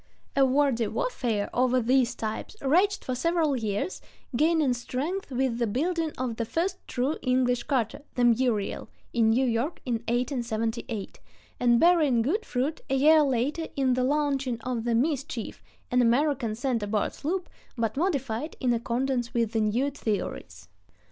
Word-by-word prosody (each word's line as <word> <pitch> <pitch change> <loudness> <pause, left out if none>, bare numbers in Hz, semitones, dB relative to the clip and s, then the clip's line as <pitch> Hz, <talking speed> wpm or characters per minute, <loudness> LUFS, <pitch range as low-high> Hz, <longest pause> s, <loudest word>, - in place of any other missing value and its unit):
A 275 - +5
wordy 265 -4 +2
warfare 235 - -1
over 255 +1 +3
these 250 +1 +2
types 220 - -5
raged 360 +9 +2
for 255 - -2
several 320 +1 +1
years, 220 - -2 0.3
gaining 310 -1 +3
strength 280 +10 -3
with 255 -2 -1
the 235 - +1
building 320 - -1
of 245 -3 -3
the 230 - 0
first 360 - -1
true 265 +5 -1
English 250 -1 +2
cutter, 260 0 -1
the 245 - +1
Muriel, 235 -3 +1 0.2
in 230 -2 +3
New 250 +4 +3
York 245 +7 -1
in 250 - -1
1878, 235 -3 -2 0.4
and 240 -1 +4
bearing 310 -9 +4
good 385 - -1
fruit 270 +5 -1
a 270 - +2
year 305 +3 +6
later 285 +4 0
in 265 -2 +2
the 250 0 +1
launching 275 -3 0
of 240 -1 -3
the 235 -1 +1
Mischief, 265 -3 -2 0.3
an 250 0 +4
American 245 -1 +2
center 235 -3 -1
board 210 0 0
sloop, 350 +4 -3 0.3
but 225 -2 -1
modified 280 -4 -1
in 250 -2 +2
accordance 245 +1 -1
with 230 -2 +1
the 225 - +1
new 235 +7 +1
theories. 215 - -4
255 Hz, 155 wpm, -27 LUFS, 235-290 Hz, 0.4 s, year